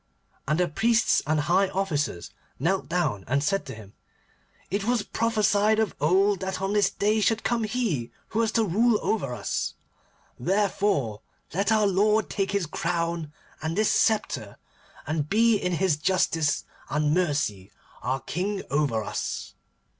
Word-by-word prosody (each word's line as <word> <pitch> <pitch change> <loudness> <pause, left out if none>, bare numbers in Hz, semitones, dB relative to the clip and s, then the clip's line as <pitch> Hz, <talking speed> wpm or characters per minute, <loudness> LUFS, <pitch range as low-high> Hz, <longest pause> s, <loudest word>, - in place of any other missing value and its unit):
And 150 +4 +1
the 180 - +3
priests 230 +8 +2
and 155 +1 +2
the 145 - +1
high 185 +5 +3
officers 150 - -2 0.3
knelt 185 +7 0
down 155 - 0
and 140 +4 +1
said 195 +2 0
to 130 - -6
him, 105 -2 -13 0.8
'It 200 +1 0
was 235 0 +1
prophesied 215 -1 +2
of 220 -4 +1
old 190 +5 +3
that 190 -1 -3
on 195 +1 -1
this 205 -2 +3
day 210 +2 +1
should 225 +1 +1
come 235 -2 0
he 210 - -1 0.2
who 220 - -2
was 225 -1 +2
to 225 - +3
rule 220 +4 +3
over 170 - 0
us. 105 - -3 0.6
Therefore, 180 - 0 0.3
let 200 +5 +1
our 215 -1 +4
lord 210 +3 +2
take 195 -1 -1
this 200 -3 +1
crown 170 -1 -2 0.3
and 160 +3 -3
this 215 0 +3
sceptre, 220 -1 0 0.5
and 155 -1 -2
be 225 +2 +4
in 180 -3 -1
his 175 -3 +1
justice 160 -2 +1 0.3
and 150 0 +1
mercy 145 - 0 0.3
our 130 +1 -1
King 190 +8 -3
over 140 -7 +1
us. - - -4
185 Hz, 155 wpm, -26 LUFS, 150-210 Hz, 0.8 s, our